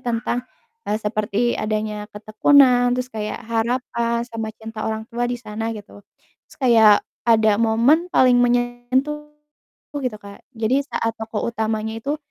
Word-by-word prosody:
tentang 240 0 -2 0.4
seperti 215 +2 -1
adanya 215 -1 -3
ketekunan 245 +4 +3
terus 250 -1 -4
kayak 215 +2 -5
harapan 235 0 -1
sama 225 -2 -5
cinta 220 -1 -6
orang 220 0 -3
tua 240 +1 -1
di 245 - -2
sana 225 -1 -5
gitu. 205 0 -12 0.5
Terus - - -18
kayak 225 -6 +5 0.2
ada 220 -2 +4
momen 235 +10 +3
paling 250 -7 +4
meyentuh 245 +5 0 0.7
gitu 250 -5 -3
Kak, 200 0 -12 0.2
jadi 235 +5 +1
saat 225 0 -1
tokoh 220 -1 -4
utamanya 220 0 -2
itu 285 +5 -2
230 Hz, 130 wpm, -21 LUFS, 215-245 Hz, 0.7 s, kayak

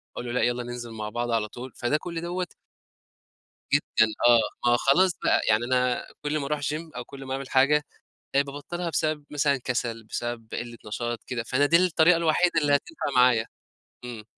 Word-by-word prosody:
أقول - - -5
له: 120 - -4
"لأ 125 - 0
يالّا 120 0 0
ننزل 120 -1 -7
مع 110 -1 -5
بعض 120 +2 -3
على 115 -2 +1
طول،" 125 +4 -9
فده 120 +5 0
كُلّ 170 +1 -5
دوّة 175 +1 -3 1.3
جدًا 110 - +3 0.2
آه، 120 0 +3
ما 120 - +5
خلاص 180 +9 +4
بقى - - +3
يعني 110 +2 +3
أنا 125 0 +1 0.2
كُلّ 150 +1 -1
ما 145 - -3
أروح 150 +1 -1
جيم 155 +3 -3
أو 125 - -4
كُلّ 135 +1 -10
ما 130 - -4
أعمل 135 0 -5
حاجة، 145 +3 +4 0.5
بقيت 140 +1 +3
بابطلها 170 +5 -5
بسبب 155 -2 -1
مثلًا 145 -1 +1
كسل، 120 -3 -3
بسبب 120 +1 -5
قلة 120 0 -5
نشاط 120 +2 -4
كده، 120 -2 -3
فأنا 130 +5 +2
دي 165 +3 +5
الطريقة 175 -1 +4
الوحيدة 170 +2 +2
اللي 145 -1 +4
هتنفع 320 - -4
معايا، 125 -3 +5 0.6
إمم. 120 -3 -7
130 Hz, 190 wpm, -26 LUFS, 120-150 Hz, 1.3 s, ما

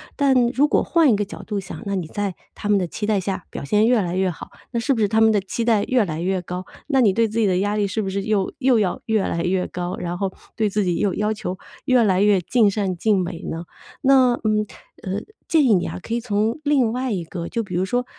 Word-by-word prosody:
但 265 -4 +3
如 270 +4 +2
果 - - +2
换 330 -6 +3
一 - - +4
个 205 - 0
角 200 - -9
度 210 -2 -3
想， 195 +3 -8
那 200 - -2
你 180 -4 -3
在 200 +3 -3 0.2
他 - - -5
们 205 -1 +4
的 180 - -1
期 210 - -4
待 210 -2 +2
下 190 -1 -4
表 - - -6
现 210 +9 +2
越 240 -1 +4
来 175 -1 -2
越 190 -1 +1
好， - - -10 0.2
那 235 - -1
是 230 - 0
不 250 - +1
是 210 - +3
他 220 +2 +2
们 220 0 +6
的 210 - +3
期 195 +4 -3
待 225 -3 +3
越 255 -3 +2
来 160 -5 -4
越 185 +2 -1
高， 180 +1 -6 0.2
那 275 -3 +2
你 215 -6 +4
对 230 +3 +2
自 215 +1 -5
己 225 - +3
的 185 -2 +2
压 205 +2 0
力 210 -1 +1
是 200 +3 -2
不 195 - -3
是 195 +1 -2
又 205 -3 0
又 260 -4 +3
要 195 -4 0
越 220 -2 +1
来 170 -3 -1
越 180 +1 0
高， 180 0 -4
然 175 0 -4
后 190 0 -2 0.2
对 220 -2 +1
自 205 +1 0
己 180 -2 0
又 200 -3 +1
要 210 +3 0
求 205 -4 -4 0.3
越 255 -2 +4
来 195 -3 +3
越 205 -3 +4
尽 215 +3 +3
善 195 -3 -2
尽 205 +1 +2
美 175 -1 -5
呢？ 165 +1 -5 0.4
那 265 -3 +5
嗯， 215 -1 +1 0.4
呃， 195 +2 -3 0.3
建 320 -3 +4
议 235 -6 +5
你 180 - 0
啊 - - -6
可 230 - -3
以 - - 0
从 220 +1 -1
另 275 -6 +2
外 255 +1 -2
一 185 -5 -2
个， 170 +1 -6
就 230 - -1
比 190 -5 -6
如 185 +2 +1
说， 245 +5 -1
205 Hz, 295 characters per minute, -22 LUFS, 185-230 Hz, 0.4 s, 们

